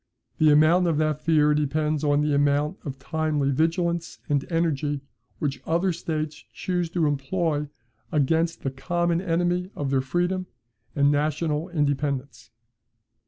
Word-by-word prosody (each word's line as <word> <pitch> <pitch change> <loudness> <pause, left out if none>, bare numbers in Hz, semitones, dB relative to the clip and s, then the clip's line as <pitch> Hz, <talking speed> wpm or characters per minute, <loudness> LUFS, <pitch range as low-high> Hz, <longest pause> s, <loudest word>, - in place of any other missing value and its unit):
The 155 -1 +6
amount 160 +4 +5
of 165 -3 +1
that 155 -1 0
fear 150 -2 +4
depends 150 +1 0
on 145 0 +3
the 150 0 +1
amount 145 +4 +1
of 135 -2 -5
timely 150 0 -1
vigilance 165 +3 0
and 145 -2 +1
energy 150 -4 0 0.4
which 140 -3 -2
other 170 +3 +1
states 155 -2 -4
choose 175 -2 -2
to 165 -1 0
employ 150 +1 0 0.4
against 160 +3 +1
the 135 - -1
common 175 +4 0
enemy 175 0 0
of 140 -2 -2
their 135 -1 +2
freedom 175 +6 -1 0.5
and 140 0 +4
national 155 +2 0
independence. 145 -4 -2
155 Hz, 135 wpm, -25 LUFS, 145-170 Hz, 0.5 s, The